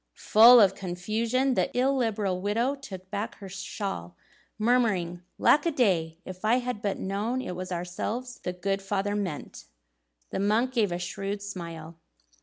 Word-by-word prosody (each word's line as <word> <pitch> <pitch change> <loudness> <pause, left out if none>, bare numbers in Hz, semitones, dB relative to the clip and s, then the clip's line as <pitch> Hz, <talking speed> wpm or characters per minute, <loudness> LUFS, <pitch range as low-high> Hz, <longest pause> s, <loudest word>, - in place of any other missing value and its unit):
Full 235 +3 +8
of 195 -3 +6
confusion, 220 +9 -1
the - - +1
illiberal 225 -8 +1
widow 230 +7 +1
took 190 -9 -10
back 210 +3 -3
her 200 - -10
shawl, 190 - -5 0.4
murmuring, 210 -7 +1 0.2
"Lack 295 - +5
a - - +2
day! 175 - +1
If 185 +1 -9
I 220 +3 +4
had 250 -4 -2
but 200 -2 -1
known 210 +6 -2
it 180 -8 -4
was 185 +1 -6
ourselves 195 +8 -4
the 180 - -3
good 195 +2 -2
father 200 +1 -1
meant!" 185 -8 -5 0.7
The - - -2
monk 215 +6 +2
gave 215 -6 +2
a 175 - -1
shrewd 195 +3 -4
smile. 170 -4 -7
200 Hz, 155 wpm, -27 LUFS, 180-235 Hz, 0.7 s, Full